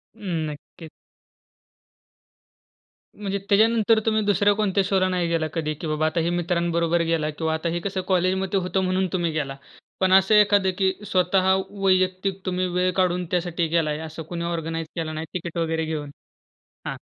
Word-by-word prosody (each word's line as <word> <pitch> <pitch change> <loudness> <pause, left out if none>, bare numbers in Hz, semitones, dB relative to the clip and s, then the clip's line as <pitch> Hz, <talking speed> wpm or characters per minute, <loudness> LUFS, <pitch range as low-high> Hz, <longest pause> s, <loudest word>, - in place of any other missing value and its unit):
अ, - - -22 0.3
नक्कीच. 150 +2 -11 2.3
म्हणजे 200 -1 -3
त्याच्यानंतर 220 +1 +4
तुम्ही 220 -1 +2
दुसऱ्या 205 0 +3
कोणत्या 200 -2 +1
शोला 190 -1 +2
नाही 180 -2 0
गेलात 165 -2 0
कधी, 155 -2 -2
की 155 +2 -7
बाबा 155 0 0
आता 160 +2 0
हे 165 +1 0
मित्रांबरोबर 170 -1 0
गेला 165 -2 0
किंवा 160 +1 -2
आता 160 +2 -2
हे 170 +1 -2
कसं 195 -1 -2
कॉलेजमध्ये 190 +1 +1
होतं 190 +1 -1
म्हणून 185 +1 +1
तुम्ही 175 -3 0
गेलात. 140 -3 -3 0.4
पण 185 -1 +3
असं 195 +3 +5
एखाद 205 -2 +4
की 190 -1 +2
स्वतः 185 0 +2 0.2
वैयक्तिक 190 -1 0
तुम्ही 185 0 0
वेळ 180 +1 +1
काढून 180 -1 +1
त्यासाठी 175 -2 0
गेला 165 -1 +1
आहे 150 0 -2
असं 160 0 -7
कुणी 170 -1 -4
ऑर्गनाइज 165 -1 -3
केलं 160 -2 -3
नाही 155 +1 -4
टिकीट 170 -2 -5
वगैरे 160 -1 0
घेऊन 155 -2 -4 0.8
हां. - - -3
180 Hz, 165 wpm, -24 LUFS, 165-190 Hz, 2.3 s, असं